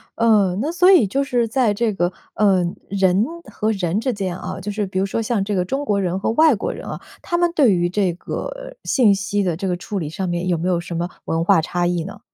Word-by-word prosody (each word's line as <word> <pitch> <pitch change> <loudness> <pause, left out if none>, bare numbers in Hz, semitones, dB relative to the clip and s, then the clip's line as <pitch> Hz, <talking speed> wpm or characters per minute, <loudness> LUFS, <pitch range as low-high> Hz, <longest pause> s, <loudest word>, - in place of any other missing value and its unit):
呃， 210 -5 +3
那 300 +5 -1
所 360 +2 +5
以 340 - +6
就 275 +9 0
是 245 -4 0
在 235 -2 +2
这 225 +2 0
个 175 -2 0 0.2
呃， 195 -3 +3 0.3
人 195 +1 +2 0.3
和 215 0 -1
人 190 -2 -1
之 255 +2 -1
间 190 -4 -3
啊， 185 0 -6
就 205 +3 -4
是 210 0 -2
比 190 -1 -3
如 190 - +1
说 195 - -2
像 220 -2 0
这 205 +1 -2
个 180 -1 +1
中 270 +9 -2
国 205 -7 0
人 185 -1 -1
和 - - -1
外 310 +5 +5
国 195 - -3
人 - - -8
啊， - - -5 0.2
他 345 - -2
们 345 -1 +2
对 260 -9 +5
于 175 -1 +1
这 190 -1 0
个 - - -6
信 230 -7 +4
息 200 +1 -1
的 180 -4 0
这 195 - -3
个 180 - 0
处 190 +4 -5
理 165 -5 -3
上 180 +4 -4
面 175 +1 -2
有 180 - +2
没 170 +3 -2
有 175 -2 +1
什 170 0 -7
么 170 +1 -2 0.2
文 165 0 0
化 180 -1 +4
差 175 +2 -1
异 175 -2 -1
呢？ 200 - -9
195 Hz, 275 characters per minute, -21 LUFS, 180-230 Hz, 0.3 s, 以